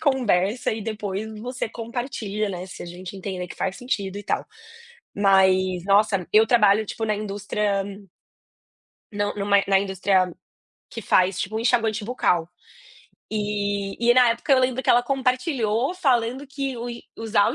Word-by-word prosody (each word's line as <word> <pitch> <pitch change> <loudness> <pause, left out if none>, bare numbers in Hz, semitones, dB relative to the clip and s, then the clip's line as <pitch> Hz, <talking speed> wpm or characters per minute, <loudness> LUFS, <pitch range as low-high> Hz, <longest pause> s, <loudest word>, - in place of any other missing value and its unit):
conversa 245 - +1
e 220 -1 -4
depois 210 -1 -4
você 250 -1 -4
compartilha, 225 -3 -4
né, 180 0 -6
se 185 - -9
a - - -8
gente 180 +2 -8
entenda 185 -2 -5
que - - -9
faz 190 0 -2
sentido 200 -6 -3
e - - -7
tal". - - -1 0.7
Mas, 190 -2 +3
nossa, 200 -2 +3
eu 220 +1 +6
trabalho, 215 -2 +4
tipo, 225 +2 -4
na 215 - 0
indústria 205 -1 -2 1.3
Não, 205 0 -2
numa 200 -1 +2
na 195 -1 +4
indústria 190 -1 +1 0.6
que 230 - -7
faz, 185 0 +2
tipo, 210 +4 -3
um - - 0
enxaguante 230 -2 +1
bucal. 180 -8 0 0.8
E 205 -2 -2
e - - +6
na 250 -2 +6
época 235 +5 0
eu 260 - +6
lembro 255 0 0
que - - -6
ela 240 0 +5
compartilhou 255 -1 0
falando 260 -5 0
que 275 -2 -4
o 240 +1 -5
en 235 0 -7 0.2
usar 220 -1 +2
o 250 - -4
210 Hz, 160 wpm, -24 LUFS, 195-240 Hz, 1.3 s, eu